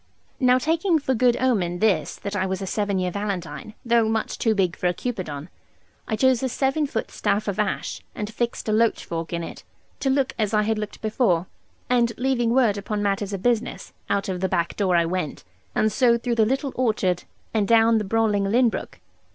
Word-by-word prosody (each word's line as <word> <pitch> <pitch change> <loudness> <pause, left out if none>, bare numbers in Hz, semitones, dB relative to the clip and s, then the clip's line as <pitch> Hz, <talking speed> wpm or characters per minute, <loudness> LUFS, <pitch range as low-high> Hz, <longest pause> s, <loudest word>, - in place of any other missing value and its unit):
Now 250 -2 +5
taking 325 +6 +2
for 275 -3 0
good 245 0 +3
omen 195 -9 +1
this, 185 -6 +1
that 200 0 -5
I 190 -1 0
was 190 0 -2
a 195 - -4
seven 200 0 -1
year 180 -1 0
Valentine, 195 -1 -4
though 235 -2 +3
much 220 -1 -2
too 225 -2 +2
big 185 -3 +1
for 180 - -1
a 175 - 0
Cupidon, 170 - -4 0.6
I 220 - 0
chose 260 +1 +3
a 260 - 0
seven 270 +4 0
foot 225 -4 -3
staff 205 +2 0
of 200 -1 -2
ash, 210 -2 -2
and 210 +1 -5
fixed 235 0 -2
a - - +1
loach 225 +1 +2
fork 165 -1 -4
in 170 -1 -2
it, - - -8 0.4
to 270 - 0
look 270 0 +1
as 215 0 +1
I 210 - +3
had 220 0 0
looked 210 +1 -6
before; 210 -6 +1 0.4
and 240 -2 +2
leaving 245 -2 +1
word 230 -4 +3
upon 205 +1 -3
matters 200 0 0
of 195 -1 -4
business, 240 0 -1 0.2
out 200 0 0
of 185 -2 -2
the 190 - +1
back 170 -1 0
door 190 -3 +1
I 170 -1 +4
went, 170 -3 -3 0.3
and 215 - +2
so 240 -1 +4
through 240 +1 -2
the 225 -2 +3
little 270 +2 -1
orchard, 210 -8 0 0.3
and 210 -3 +1
down 225 0 +5
the - - -2
brawling 210 -1 +1
Lynn 235 +4 +4
brook. - - -6
215 Hz, 210 wpm, -24 LUFS, 190-240 Hz, 0.6 s, Now